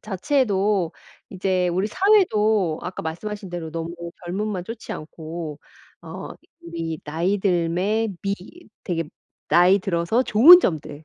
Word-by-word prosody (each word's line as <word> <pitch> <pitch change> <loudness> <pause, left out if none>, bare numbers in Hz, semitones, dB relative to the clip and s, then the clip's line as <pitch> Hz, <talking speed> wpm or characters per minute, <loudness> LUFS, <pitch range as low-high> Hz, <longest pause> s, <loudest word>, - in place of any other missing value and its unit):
자체도 200 - 0 0.4
이제 185 -1 0
우리 185 +3 0
사회도 220 - +2
아까 180 +2 -6
말씀하신 195 +4 -6
대로 170 -2 -5
너무 165 0 -5 0.3
젊음만 190 +1 -3
쫒지 225 +3 -8
않고 155 -1 -7 0.4
어 - - -8 0.3
우리 165 -1 -5
나이 170 +6 0
듦에 190 +4 0
미 200 0 0 0.5
되게 165 -3 -2 0.4
나이 180 +3 +5
들어서 180 +5 0
좋은 295 +11 +8
점들 155 - -3
185 Hz, 250 characters per minute, -23 LUFS, 170-210 Hz, 0.5 s, 좋은